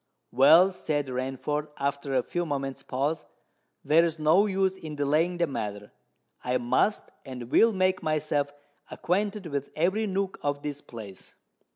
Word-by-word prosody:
"Well," 160 +9 +6
said 145 -6 -2
Rainford, 135 +4 -3
after 140 0 -2
a 130 - +2
few 175 - -2
moments' 135 -4 -3
pause, 145 +5 -2 0.6
"there's 165 +1 +3
no 160 +7 +4
use 190 -1 +1
in 155 -5 -8
delaying 155 +5 +1
the 170 - +2
matter. 105 -7 -5 0.5
I 125 0 +1
must 125 - 0
and 125 -2 -8
will 230 - +5
make 185 -2 +1
myself 150 -2 0 0.4
acquainted 200 +2 -1
with 140 -3 -3
every 190 +7 +1
nook 195 0 -2
of 145 0 -2
this 145 -1 -5
place." 105 -5 -11
150 Hz, 145 wpm, -27 LUFS, 135-180 Hz, 0.6 s, Well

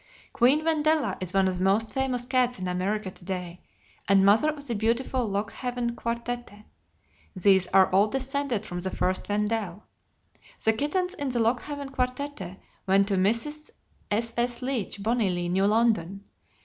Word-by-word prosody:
Queen 270 +6 +3
Wendella 310 -1 +2
is 185 -1 -2
one 195 0 +3
of 185 -1 -2
the - - 0
most 205 +4 +2
famous 260 -2 -1
cats 250 -1 +1
in 185 -1 -4
America 190 +3 -2
to 185 - -15
day, 180 -1 -5 0.5
and 195 0 +5
mother 215 +10 +5
of 295 -2 -5
the 240 - -2
beautiful 230 +2 0
Lockehaven 235 +4 -2
Quartette. 235 -2 -5 0.7
These 190 -1 +4
are 190 0 +5
all 195 +3 +4
descended 265 -2 -2
from 175 -3 -5
the 190 - -2
first 185 +1 -1
Wendell. 210 -2 -1 0.8
The 220 - +4
kittens 360 - -1
in 285 -8 -3
the 250 - -2
Lockehaven 270 +5 -1
Quartette 255 -7 -3 0.3
went 195 +1 +4
to - - +1
Mrs. 230 +11 0 0.4
S.S. 235 +3 -1
Leach, 235 -6 -2
Bonny 225 -2 +1
Lea, 175 -1 -2
New 190 +3 +2
London, 210 -4 +1
Ct. - - -35
225 Hz, 160 wpm, -27 LUFS, 195-255 Hz, 0.8 s, and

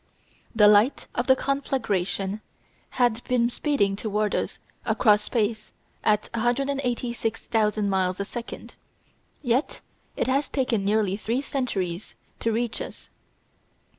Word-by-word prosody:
The 210 -2 +7
light 210 +6 +4
of 240 - -1
the 260 - +7
conflagration 215 -8 -1 0.6
had 245 -2 +2
been 245 -1 +2
speeding 240 -9 +1
toward 210 0 -1
us - - -2 0.3
across 210 -3 +4
space 215 -1 -1 0.3
at 210 0 +2
186,000 235 -4 0
miles 185 -1 +1
a 200 - -1
second, 235 +3 -7 0.7
yet 250 +3 0 0.4
it - - +1
has 275 +3 +1
taken 250 -7 0
nearly 200 -1 +1
three 235 +5 -1
centuries 200 -10 -3 0.2
to 230 - 0
reach 230 0 -1
us. - - -9
225 Hz, 115 wpm, -25 LUFS, 205-250 Hz, 0.7 s, The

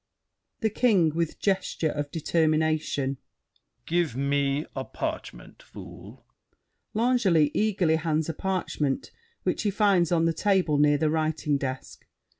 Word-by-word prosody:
THE 220 -2 +1
KING 200 -8 +3
(with 165 -1 -2
gesture 190 -5 0
of 145 -1 -4
determination). 155 -3 0 0.7
Give 170 -6 0
me 140 +2 0
a - - -3
parchment, - - -6
fool. - - -12 0.7
[L'Angely 210 - +3
eagerly 190 -7 +2
hands 160 -1 -1
a 165 - -2
parchment 155 -6 -2 0.3
which - - 0
he 210 - +1
finds 195 -4 +2
on 165 -1 +3
the 165 - +2
table 180 -5 +1
near 145 0 +4
the 155 0 +1
writing 155 -2 0
desk. 130 -1 -6
160 Hz, 125 wpm, -26 LUFS, 150-190 Hz, 0.7 s, near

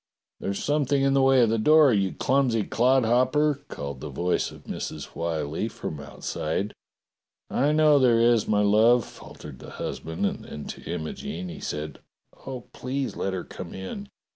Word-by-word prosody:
"There's 100 0 -3
something 145 -2 +1
in 135 0 +3
the 135 - +4
way 135 -1 +5
of 115 - +3
the 115 - +1
door, 150 +2 +6
you 100 -3 +1
clumsy 125 -5 +1
clodhopper!" 130 +5 +2
called 70 -2 -6
the 75 - -5
voice 85 +6 0
of - - -14
Mrs. - - -5
Why 85 -2 -2
Hie 80 +9 -2
from 80 -8 -6
out 70 - -11
side. 95 +7 -2 0.8
"I 145 +3 +2
know 150 -1 +5
there 120 -3 +4
is, 115 -2 +4
my 105 -1 +3
love," 110 +3 +5
faltered 70 -4 -12
the - - -10
husband, 80 0 -3
and - - -2
then 75 - -8
to - - -7
Imogene 80 +3 -5
he - - -8
said: 75 -1 -5 0.5
"Oh, 130 -2 -5
please 130 +1 -3
let 95 - -2
her 95 - -3
come 85 - -9
in. 200 - -7
115 Hz, 175 wpm, -26 LUFS, 85-135 Hz, 0.8 s, door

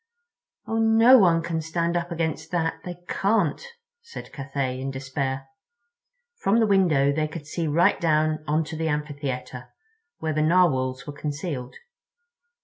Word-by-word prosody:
"Oh, 225 - -1
no 225 +3 +6
one 170 -4 +4
can 165 -1 -2
stand 170 +2 -1
up 175 0 -2
against 165 -2 -3
that—they 175 +1 -3
can't," 200 - +1 0.4
said 465 - -10
Cathay, 135 -2 -3
in 135 - -3
despair. 135 0 -3 0.9
From 205 +4 +2
the 225 - +4
window 175 -9 +3
they 155 +1 0
could 155 -1 -8
see 165 +1 -3
right 160 +4 +3
down 155 -1 +1
onto 155 +2 -1
the 160 +1 -2
amphitheater, 145 -4 -4 0.5
where 160 -1 -2
the 155 - 0
Narwhals 150 -6 +2
were 145 - -7
concealed. 145 -3 -5
155 Hz, 140 wpm, -25 LUFS, 140-175 Hz, 0.9 s, no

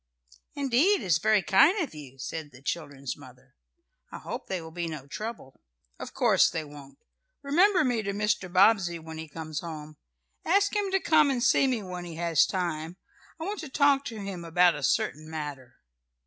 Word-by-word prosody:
"Indeed 285 +9 +2
it - - -6
is 165 -4 +3
very 210 +1 +3
kind 280 - +5
of 325 - -3
you," 140 -4 -11
said 155 +3 -6
the 130 +1 -16
children's 140 -4 -4
mother. 130 -2 -16 0.6
"I - - -7
hope - - -7
they 190 - -2
will 160 -1 -10
be 170 0 -4
no 155 -4 -7
trouble." 210 - -7 0.4
"Of - - -8
course - - +4
they 160 - -3
won't. 145 -2 -13 0.5
Remember 360 +6 +4
me 245 -4 0
to 200 -1 -3
Mr. 205 -2 -1
Bobbsey 185 -2 +4
when 160 -1 -9
he 160 -1 -8
comes 155 0 -5
home. 155 -2 -8 0.5
Ask 400 +4 +2
him 410 -1 0
to 385 0 +2
come 315 -5 +4
and 250 -3 0
see 270 - +4
me 245 -5 -1
when 180 -1 -6
he 170 -2 -8
has 165 -2 +2
time. 170 -2 -3 0.4
I - - -5
want 405 +4 -4
to 310 - -7
talk 280 0 +3
to 225 -2 -6
him 195 -3 -6
about 175 +1 +4
a 150 - -6
certain 155 +3 0
matter." 145 -6 -7
175 Hz, 190 wpm, -27 LUFS, 155-245 Hz, 0.6 s, kind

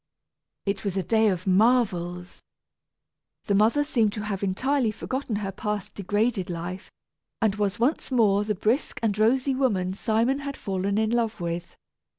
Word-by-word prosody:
It 200 -1 -2
was 195 -2 -2
a 190 - 0
day 220 +3 +3
of 185 -3 -1
marvels! 185 -4 +1 1.0
The 205 - 0
mother 220 +8 +4
seemed 230 -8 +1
to 210 - -4
have 200 -3 -3
entirely 245 +6 +1
forgotten 255 +2 -3
her 200 -2 -3
past 210 0 -4
degraded 205 0 -1
life, 175 +2 -5 0.5
and 220 -3 +2
was 205 0 -1
once 255 +7 +1
more 210 -6 +3
the 210 0 -1
brisk 220 +9 0
and 210 -3 +1
rosy 260 +5 +3
woman 205 -9 0
Simon 230 +7 +1
had 280 -1 -5
fallen 195 0 -2
in 220 0 +1
love 230 -3 0
with. 170 0 -4
210 Hz, 160 wpm, -26 LUFS, 195-235 Hz, 1.0 s, mother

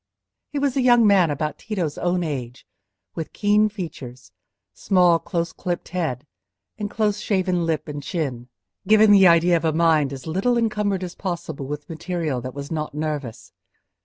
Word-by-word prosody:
He 290 - -5
was 280 -2 0
a 270 - +2
young 240 -2 +5
man 195 -5 +5
about 150 +1 -3
Tito's 180 -9 -3
own 180 0 0
age, 130 -6 -5 0.5
with 160 - -6
keen 210 +1 +3
features, 140 - -8 0.4
small 180 -3 +3
close 170 -1 -3
clipped 175 -1 -4
head, 155 -7 -3 0.5
and 205 -1 -3
close 210 -1 0
shaven 185 -5 0
lip 160 -1 -1
and 145 -1 -5
chin, 135 -6 -4 0.4
giving 215 0 +6
the 195 -2 +7
idea 170 +1 +5
of 165 - -5
a 160 - +3
mind 155 -3 +2
as 135 -1 -8
little 195 +10 0
encumbered 210 -4 0
as 175 -1 -5
possible 170 -7 -5
with 150 +1 -6
material 165 -5 -3
that 130 +2 -7
was 140 +1 -7
not 155 -2 -3
nervous. 150 -6 -5
170 Hz, 165 wpm, -23 LUFS, 150-200 Hz, 0.5 s, the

